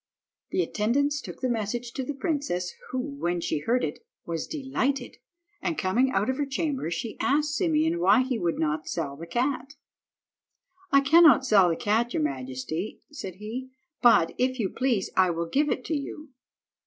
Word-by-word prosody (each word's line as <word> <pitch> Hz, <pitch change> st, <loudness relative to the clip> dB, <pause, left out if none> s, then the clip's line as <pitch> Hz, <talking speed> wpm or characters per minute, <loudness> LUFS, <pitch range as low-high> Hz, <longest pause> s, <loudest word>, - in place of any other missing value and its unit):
The 370 Hz, -, +1 dB
attendants 280 Hz, +6 st, 0 dB
took -, -, -9 dB
the 260 Hz, -, +1 dB
message 235 Hz, +1 st, -2 dB
to 265 Hz, -, -3 dB
the 285 Hz, +3 st, -4 dB
princess, 270 Hz, -, -2 dB, 0.2 s
who, 255 Hz, -, -3 dB
when 255 Hz, -11 st, -2 dB
she 160 Hz, -, -1 dB
heard 240 Hz, +11 st, +1 dB
it, 150 Hz, -, -4 dB, 0.2 s
was 165 Hz, -2 st, -3 dB
delighted, 270 Hz, -2 st, -2 dB, 0.4 s
and 335 Hz, -3 st, -2 dB
coming 230 Hz, +7 st, +2 dB
out 215 Hz, -, +1 dB
of 260 Hz, 0 st, 0 dB
her 290 Hz, -, 0 dB
chamber 275 Hz, -, -2 dB
she 225 Hz, +6 st, -4 dB
asked 300 Hz, +2 st, +1 dB
Simeon 320 Hz, 0 st, +1 dB
why 265 Hz, -6 st, +5 dB
he 255 Hz, -3 st, -2 dB
would 170 Hz, -3 st, 0 dB
not 155 Hz, 0 st, -1 dB
sell 145 Hz, -5 st, -3 dB
the 165 Hz, +4 st, -9 dB
cat. 260 Hz, -, -1 dB, 1.2 s
"I 275 Hz, -1 st, +6 dB
cannot 295 Hz, -2 st, +6 dB
sell 200 Hz, -7 st, +5 dB
the 165 Hz, -, +1 dB
cat, 225 Hz, +6 st, 0 dB
your 155 Hz, -, +1 dB
majesty," 135 Hz, +7 st, -4 dB
said 195 Hz, -, -7 dB
he, 225 Hz, +6 st, -6 dB, 0.3 s
"but, 230 Hz, -9 st, +5 dB
if 255 Hz, +1 st, +1 dB
you 200 Hz, -4 st, 0 dB
please, 245 Hz, -5 st, 0 dB
I 185 Hz, -1 st, +4 dB
will 170 Hz, 0 st, -1 dB
give 290 Hz, -, +1 dB
it 255 Hz, -, -2 dB
to 320 Hz, -, -1 dB
you." 300 Hz, +1 st, -6 dB
250 Hz, 180 wpm, -27 LUFS, 180-280 Hz, 1.2 s, I